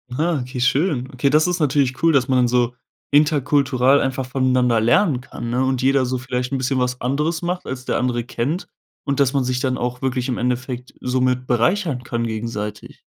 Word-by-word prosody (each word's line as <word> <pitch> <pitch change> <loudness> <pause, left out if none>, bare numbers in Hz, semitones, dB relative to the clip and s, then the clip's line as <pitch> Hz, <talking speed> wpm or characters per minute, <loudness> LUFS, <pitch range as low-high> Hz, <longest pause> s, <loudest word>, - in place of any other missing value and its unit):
Ah 160 +1 0
okay, 125 0 -5
schön. 135 0 +1
Okay, 130 +2 +1
das 155 +4 +3
ist 180 -1 -1
natürlich 135 -3 +1
cool, 165 -1 +4
dass 130 -3 +2
man 130 -1 +3
dann 125 - +3
so 120 0 +1 0.4
interkultural 140 -2 +3
einfach 130 0 -1
von 130 +1 -1
einander 125 -2 +3
lernen 125 - +3
kann, 120 -1 -7
ne 125 +2 +1
und 130 -1 0
jeder 135 0 +3
so 130 +1 -1
vielleicht 125 +1 -3
'n - - +1
bisschen 130 0 0
was 125 0 -1
anderes 150 +6 -1
macht, 180 +1 -3
als 130 -1 -5
der - - -1
andere 120 -1 -1
kennt 140 - -3 0.4
und 140 -1 -2
dass 140 -1 +3
man 135 - +1
sich 125 0 -1
dann 130 -1 -1
auch 125 +1 -3
wirklich 130 -1 -1
im 125 - -1
Endeffekt 125 0 -3
somit 125 0 0
bereichern 130 - +1
kann 120 -2 -2
gegenseitig. 110 -2 -5
130 Hz, 205 wpm, -21 LUFS, 125-140 Hz, 0.4 s, cool